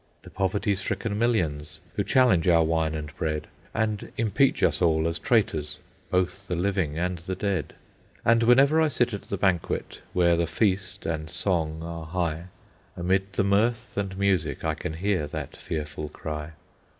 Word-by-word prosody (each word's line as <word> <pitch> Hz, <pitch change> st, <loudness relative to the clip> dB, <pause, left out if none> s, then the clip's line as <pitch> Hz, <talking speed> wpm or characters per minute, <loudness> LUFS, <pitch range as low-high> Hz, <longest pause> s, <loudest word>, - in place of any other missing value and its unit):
The -, -, -12 dB
poverty 100 Hz, +2 st, 0 dB
stricken 105 Hz, +2 st, -2 dB
millions 80 Hz, -10 st, 0 dB
Who 100 Hz, -, 0 dB
challenge 110 Hz, -, +4 dB
our 85 Hz, -2 st, +6 dB
wine 80 Hz, -1 st, +1 dB
and 75 Hz, -2 st, -6 dB
bread, 75 Hz, -1 st, -1 dB, 0.3 s
And 110 Hz, -2 st, -2 dB
impeach 115 Hz, +4 st, +2 dB
us -, -, +2 dB
all 80 Hz, -2 st, +3 dB
as 85 Hz, 0 st, -2 dB
traitors, 80 Hz, -11 st, +1 dB, 0.3 s
Both 90 Hz, +2 st, 0 dB
the 90 Hz, -, -1 dB
living 90 Hz, -4 st, 0 dB
and 90 Hz, +1 st, -1 dB
the 95 Hz, +3 st, -4 dB
dead. 95 Hz, -5 st, -2 dB, 0.5 s
And 115 Hz, 0 st, +5 dB
whenever 135 Hz, +7 st, +5 dB
I 160 Hz, -, +4 dB
sit 120 Hz, -5 st, +1 dB
at 100 Hz, -, -3 dB
the 100 Hz, -, -1 dB
banquet, 95 Hz, -3 st, 0 dB
Where 85 Hz, -1 st, +4 dB
the 85 Hz, 0 st, +1 dB
feast 95 Hz, +1 st, -1 dB
and 80 Hz, -1 st, -2 dB
song 80 Hz, -2 st, -1 dB
are 85 Hz, -1 st, -6 dB
high, 85 Hz, -1 st, -2 dB, 0.5 s
Amid 95 Hz, +2 st, 0 dB
the -, -, +1 dB
mirth 105 Hz, +4 st, +1 dB
and 95 Hz, -2 st, -2 dB
music 90 Hz, -8 st, +1 dB
I -, -, +1 dB
can 80 Hz, -, -5 dB
hear 90 Hz, -2 st, 0 dB
that 75 Hz, 0 st, -6 dB
fearful 75 Hz, -1 st, -5 dB
cry. 75 Hz, +1 st, -6 dB
90 Hz, 165 wpm, -26 LUFS, 80-100 Hz, 0.5 s, our